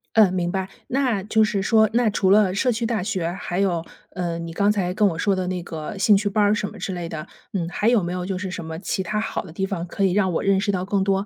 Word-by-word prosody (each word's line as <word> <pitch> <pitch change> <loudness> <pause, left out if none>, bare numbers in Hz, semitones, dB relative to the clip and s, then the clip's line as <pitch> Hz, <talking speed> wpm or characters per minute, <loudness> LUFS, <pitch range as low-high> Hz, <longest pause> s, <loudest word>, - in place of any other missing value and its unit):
嗯， 210 -5 +6
明 175 -1 0
白。 190 0 -2 0.2
那 250 -7 0
就 220 +1 +2
是 200 -2 -1
说 220 +2 +4
那 235 -2 +3
除 190 -1 +2
了 205 -3 +5
社 250 +6 +1
区 230 0 0
大 225 -3 0
学， 180 -4 -2
还 180 0 -4
有， 175 -4 0 0.2
呃， 175 -2 -3
你 170 0 -5
刚 200 +5 +2
才 185 -4 0
跟 210 0 +3
我 165 -3 -2
说 200 +3 +2
的 185 -1 -1
那 180 -1 -3
个 160 +3 -6
兴 205 0 +5
趣 205 0 0
班 210 +1 +2
儿 205 - +4
什 210 -1 -1
么 - - -12
之 - - -4
类 175 -1 -4
的， 155 -1 -6 0.3
嗯， 175 -4 -1
还 210 - -1
有 235 -5 +4
没 175 - -3
有 180 0 -3
就 190 -1 -2
是 185 -1 -4
什 175 - -5
么 160 0 -5
其 190 - -2
他 210 +4 -1
好 - - -3
的 160 - -11
地 190 +3 -1
方 180 -3 -4
可 195 - -2
以 190 - +3
让 190 -2 +2
我 - - -1
认 195 -1 +3
识 200 - -2
到 185 -2 0
更 200 0 0
多， 195 0 +1
195 Hz, 315 characters per minute, -23 LUFS, 180-210 Hz, 0.3 s, 嗯